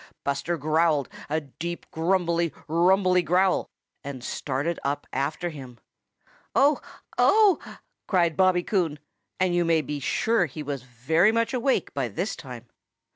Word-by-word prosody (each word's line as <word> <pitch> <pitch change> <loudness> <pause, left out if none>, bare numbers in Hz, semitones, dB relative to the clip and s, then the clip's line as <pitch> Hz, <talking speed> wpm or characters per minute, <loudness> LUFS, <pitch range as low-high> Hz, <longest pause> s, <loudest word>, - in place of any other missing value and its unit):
Buster 140 +5 -1
growled 155 -1 +1 0.2
a 155 +2 +1
deep, 170 +5 -6
grumbly, 170 -1 +1 0.2
rumbly 180 +3 +3
growl 180 +2 +2 0.3
and 130 -3 -7
started 145 +7 -2
up 145 +1 -2
after 150 +6 -1
him. 130 -6 -10 0.8
"Oh! 285 +2 +4 0.4
Oh!" 420 -5 +5 0.5
cried 170 -4 +2
Bobby 185 -2 +3
Coon, 175 -8 0 0.4
and 185 -1 +2
you 175 0 +2
may 165 -1 +3
be 145 +1 -4
sure 205 - +1
he 150 +2 -7
was 140 -2 -4
very 130 - +2
much 230 +2 0
awake 255 -5 0
by 135 -3 -1
this 180 - -3
time. 125 -4 -9
165 Hz, 135 wpm, -26 LUFS, 140-185 Hz, 0.8 s, Oh